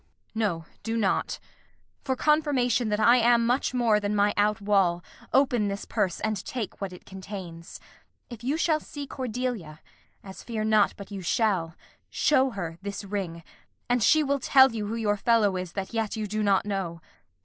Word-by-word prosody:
Kent. - - -42
No, 190 -7 -1 0.2
do 225 0 -2
not. 200 -4 0 0.7
For 265 -2 -1
confirmation 265 -6 +2
that 210 0 0
I 235 +3 +6
am 235 0 +4
much 245 +3 +1
more 235 -4 +2
Than 205 0 -2
my 205 0 +3
out 210 +1 +2
wall, 195 -4 +2 0.3
open 250 -5 +3
this 200 0 -4
purse 200 -6 -1
and 215 -3 -2
take 235 -6 -5
What 195 -2 -3
it 180 - -13
contains. 190 -3 -9 0.5
If 235 -2 -10
you 275 +5 0
shall 320 -2 +2
see 290 -1 -8
Cordelia 245 - -4 0.4
(As 190 -1 -10
fear 225 -3 -4
not 215 -1 +3
but 200 0 -10
you 195 -1 -5
shall), 180 -3 0 0.3
show 270 -3 +3
her 175 -7 -6
this 200 +1 -5
ring, 190 -4 -4 0.4
And 245 0 +1
she 305 +8 +5
will 280 0 0
tell 265 0 +6
you 215 -2 -4
who 220 - -3
your 210 -2 0
fellow 210 -2 +2
is 180 -2 -5
That 195 +2 -5
yet 225 -2 -1
you 215 -1 -3
do 215 +1 -2
not 200 -2 +2
know. 190 -5 -3
210 Hz, 180 wpm, -26 LUFS, 195-245 Hz, 0.7 s, I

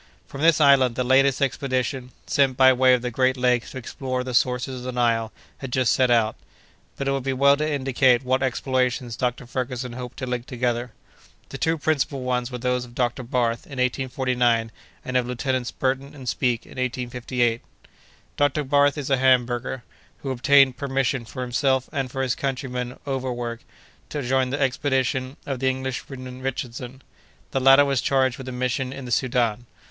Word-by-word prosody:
From 140 - -8
this 165 0 +5
island 135 -5 +5
the 125 - 0
latest 135 +2 +3
expedition, 130 -2 -1 0.2
sent 135 -2 +2
by 130 0 +7
way 130 0 +5
of 125 - -4
the 125 - -2
great 130 +2 +2
lakes 125 -1 +1
to - - -8
explore 130 +1 -4
the 125 0 -5
sources 125 +1 +1
of - - -9
the 130 - -3
Nile, 115 -2 +1 0.3
had 135 -2 -7
just 130 -1 +2
set 130 -1 +3
out. 115 -2 +3 0.6
But 140 - -3
it - - +2
would 135 0 -1
be 135 +1 -1
well 140 +2 +5
to 155 +1 -1
indicate 130 -2 +2
what 130 +1 +1
explorations 125 -2 -1
Dr. 125 +1 -2
Ferguson 125 -1 -4
hoped 125 0 -7
to 130 - -4
link 125 -1 -4
together. 125 -2 -2 0.6
The 135 - -7
two 165 0 +1
principal 140 -3 -1
ones 125 -1 -1
were 125 - -5
those 125 0 -1
of 120 -1 -13
Dr. 120 0 0
Barth 120 -2 -1
in - - -11
1849, 125 -3 0 0.3
and 130 0 0
of 125 -1 0
Lieutenants 125 0 -2
Burton 135 +2 -2
and 130 -3 -10
Speke 120 -2 0
in - - -10
1858. 125 -1 -1 0.8
Dr. 145 +1 +2
Barth 145 +1 +3
is 140 -1 -4
a 135 - +4
Hamburger, 125 -1 +1 0.4
who 135 - -2
obtained 135 0 +4
permission 135 -2 -1
for 125 +3 -6
himself 130 +1 +1
and 135 -3 -2
for 135 +1 -3
his 130 -2 +1
countryman 125 -2 -3
Overweg 125 -4 -3 0.5
to 145 -2 -4
join 130 +1 +1
the 140 - -2
expedition 130 -1 0
of 135 -3 -3
the 130 0 +2
Englishman 130 0 -5
Richardson. 130 0 -5 0.5
The 135 - 0
latter 135 +2 +7
was 140 -3 +1
charged 130 -2 +1
with 130 -1 -6
a - - -5
mission 125 +1 -2
in 135 -1 -7
the 120 - -7
Soudan. 120 -2 0
130 Hz, 185 wpm, -24 LUFS, 125-135 Hz, 0.8 s, by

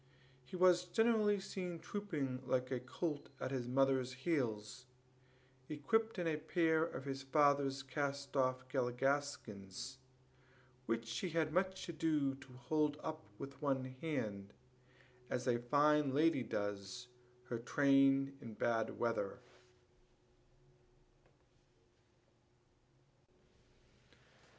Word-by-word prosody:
He 125 - -8
was 180 -1 +5
generally 210 +1 +3
seen 180 -2 -4
trooping 155 -11 -3
like 130 0 0
a 130 - 0
colt 145 +4 -4
at 130 - -3
his 125 -3 -2
mother's 130 0 +2
heels, 125 -4 -2 0.8
equipped 220 +10 +1
in 175 - -1
a 160 -2 +1
pair 160 0 +2
of 150 -4 -4
his 135 -1 -3
father's 140 -1 +3
cast 140 +1 -3
off 130 -1 +1
galligaskins, 130 -4 -2 0.9
which 115 0 -1
he 185 - -2
had 160 -2 0
much 190 +1 0
ado 155 -4 +1
to 135 -1 -13
hold 150 +4 0
up 155 0 -4 0.2
with 140 +1 -8
one 130 -3 -1
hand, 105 -11 -3 0.8
as 125 - -2
a 120 -2 +2
fine 145 +2 +3
lady 155 -2 +4
does 100 +2 -4 0.4
her 120 - -2
train 135 +1 +4
in 115 -4 -8
bad 115 -1 0
weather. 115 -4 -1
135 Hz, 105 wpm, -37 LUFS, 125-155 Hz, 0.9 s, was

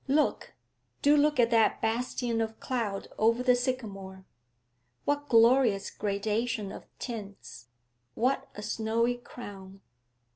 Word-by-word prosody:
Look, 295 +3 +1 0.5
do 290 +1 +6
look 295 -2 +3
at 235 0 +4
that 225 -2 +3
bastion 235 0 -1
of 225 0 -4
cloud 225 -6 -3
over 230 +3 +3
the 250 0 +5
sycamore! 200 -7 -4 0.8
What 290 0 -1
glorious 230 -3 +4
gradation 210 +1 -2
of - - -10
tints! 200 - -8 0.5
What 265 +3 0
a 210 - -7
snowy 225 +3 0
crown!' 195 -5 -11
230 Hz, 115 wpm, -29 LUFS, 205-250 Hz, 0.8 s, do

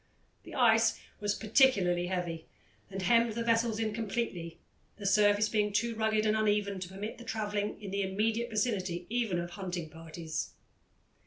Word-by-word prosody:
The - - -11
ice 225 -2 +4 0.2
was 205 0 0
particularly 200 -7 +3
heavy, 175 -3 -3 0.4
and 195 -1 -5
hemmed 230 +3 +4
the 230 +1 -2
vessels 230 -1 +2
in 220 -1 -1
completely, 200 -7 -3 0.4
the 205 - -8
surface 205 +1 +4
being 210 -1 +1
too 230 +3 0
rugged 220 -1 +1
and 215 0 +3
uneven 205 -2 +1
to 180 -1 -6
permit 205 +5 -6
of 235 - -12
travelling 210 -3 -2
in 200 -3 -7
the 200 +1 0
immediate 220 +5 0
vicinity 195 -6 -1
even 230 -7 0
of 175 0 -3
hunting 175 -4 -5
parties. 165 0 -5
210 Hz, 160 wpm, -31 LUFS, 185-225 Hz, 0.4 s, ice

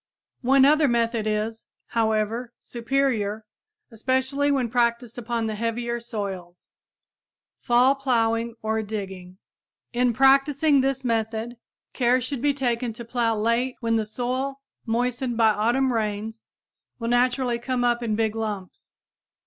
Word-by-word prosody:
One 265 +1 +5
other 300 +1 +5
method 230 -2 0
is, 215 +1 -2 0.2
however, 225 +1 0
superior 230 -4 -1 0.5
especially 260 +5 0
when 265 -4 +1
practiced 235 0 0
upon 235 -1 -2
the 220 - -2
heavier 235 +2 -2
soils 195 -6 -7 0.9
fall 245 +3 +4
plowing 230 -4 0
or 220 0 0
digging. 190 -4 -6 0.6
In 245 0 +2
practicing 275 +3 +4
this 270 0 -1
method 225 0 -2 0.4
care 250 0 +3
should 255 0 -4
be 290 +1 +3
taken 240 -3 -1
to 235 +1 -9
plow 235 -1 0
late 235 +4 0
when 230 -1 0
the 220 - +1
soil, 255 +5 -3 0.3
moistened 245 +1 -1
by 225 -2 +5
autumn 240 +5 +1
rains, 220 0 -3 0.5
will 230 -1 -3
naturally 245 0 +1
come 245 0 -1
up 240 0 +2
in 225 -3 -1
big 220 0 0
lumps. 210 -4 -6
235 Hz, 130 wpm, -24 LUFS, 220-255 Hz, 0.9 s, One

